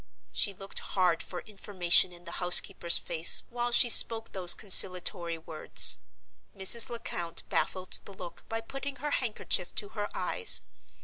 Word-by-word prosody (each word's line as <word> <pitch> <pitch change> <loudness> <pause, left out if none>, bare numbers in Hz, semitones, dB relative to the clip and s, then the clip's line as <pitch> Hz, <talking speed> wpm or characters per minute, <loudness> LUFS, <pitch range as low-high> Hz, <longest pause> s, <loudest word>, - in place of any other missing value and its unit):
She 200 -3 -4
looked 195 +1 -5
hard 180 -3 -3
for 180 - -10
information 190 -4 0
in 175 0 -16
the 170 - -11
housekeeper's 180 -1 +2
face 165 -1 +1
while 240 0 -6
she 240 - +3
spoke 225 -1 +4
those 180 -2 +1
conciliatory 180 -3 +5
words. 160 -1 +2 0.6
Mrs. 200 +4 0
Lecount 175 -8 -6
baffled 185 -1 -2
the 200 - -14
look 180 -2 -13
by 225 0 -6
putting 275 +4 -10
her 290 +2 -8
handkerchief 215 -8 -3
to 205 - -5
her 210 -1 -8
eyes. 180 - -2
190 Hz, 145 wpm, -26 LUFS, 175-225 Hz, 0.6 s, conciliatory